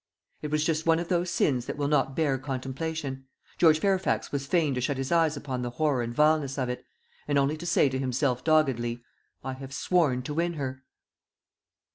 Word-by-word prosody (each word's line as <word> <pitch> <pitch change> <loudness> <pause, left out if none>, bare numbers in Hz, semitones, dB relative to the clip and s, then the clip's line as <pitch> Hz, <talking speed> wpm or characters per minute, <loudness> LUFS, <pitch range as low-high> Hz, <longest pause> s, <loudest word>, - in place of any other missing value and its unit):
It 150 - -4
was 155 0 +1
just 160 0 0
one 165 0 +5
of 170 0 -4
those 175 0 +1
sins 130 -7 +1
that - - -4
will 145 -1 0
not 135 -2 +1
bear 145 -5 +1
contemplation. 135 +1 -4 0.3
George 160 -3 +6
Fairfax 190 +1 0
was 140 -1 -3
fain 155 -3 +2
to 125 - -2
shut 135 +2 -1
his 135 0 -3
eyes 165 -3 +3
upon 130 -3 -4
the 120 - -2
horror 140 0 0
and 120 0 -3
vileness 150 0 +2
of 130 -2 -1
it, 125 - -4 0.4
and 145 -1 +1
only 140 +2 +2
to 175 +3 -6
say 170 - +4
to 130 0 -2
himself 130 -1 0
doggedly, 125 -7 +1 0.4
"I 130 0 -3
have 135 0 -9
sworn 145 -9 +1
to 145 - -4
win 170 +2 0
her." 130 -4 -5
140 Hz, 200 wpm, -27 LUFS, 130-160 Hz, 0.4 s, George